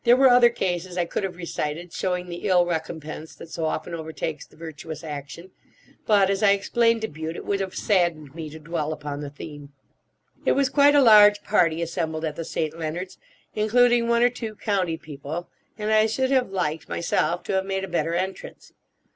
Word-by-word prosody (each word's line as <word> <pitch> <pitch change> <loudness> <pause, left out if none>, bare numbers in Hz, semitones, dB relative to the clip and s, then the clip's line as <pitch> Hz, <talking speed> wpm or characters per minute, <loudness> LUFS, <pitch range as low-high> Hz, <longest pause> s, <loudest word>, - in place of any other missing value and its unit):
There 240 +1 +6
were 265 0 +6
other 245 -1 +7
cases 180 -4 -3
I 175 - +1
could 170 - -3
have 190 -2 -3
recited 170 -1 -4
showing 180 -1 -2
the 175 -1 -5
ill 180 -1 +5
recompense 160 -2 -5
that 165 - -12
so 165 - -3
often 155 +2 -3
overtakes 160 -1 -5
the - - -22
virtuous 160 0 -8
action; 150 +4 -8 0.6
but, 205 -3 +5
as 195 - -1
I 200 -2 +6
explained 230 +3 +2
to 220 - -1
Bute, 160 0 -6
it - - -7
would 200 -1 0
have 190 -1 -4
saddened 170 -8 0
me 160 -1 -6
to 155 - -10
dwell 155 -1 -3
upon 145 -1 -6
the 145 - -5
theme. 145 0 -10 0.7
It - - +3
was 275 -1 +2
quite 285 +1 +5
a 285 - +6
large 210 -3 +7
party 170 -5 +2
assembled 165 -1 -3
at 155 -2 -3
the 165 - -4
St. 155 -1 -3
Leonards', 170 +4 -5 0.3
including 240 +2 +3
one 235 0 +3
or 245 - +6
two 225 -3 -6
county 190 -6 -1
people, 155 +2 -7 0.3
and 215 0 -1
I 215 0 +5
should 260 +4 0
have 260 -4 +2
liked, 160 -5 -2
myself, 170 0 0
to - - -3
have 190 0 +1
made 195 0 -2
a - - -3
better 170 -2 -1
entrance. 190 +2 -5
175 Hz, 200 wpm, -24 LUFS, 160-210 Hz, 0.7 s, other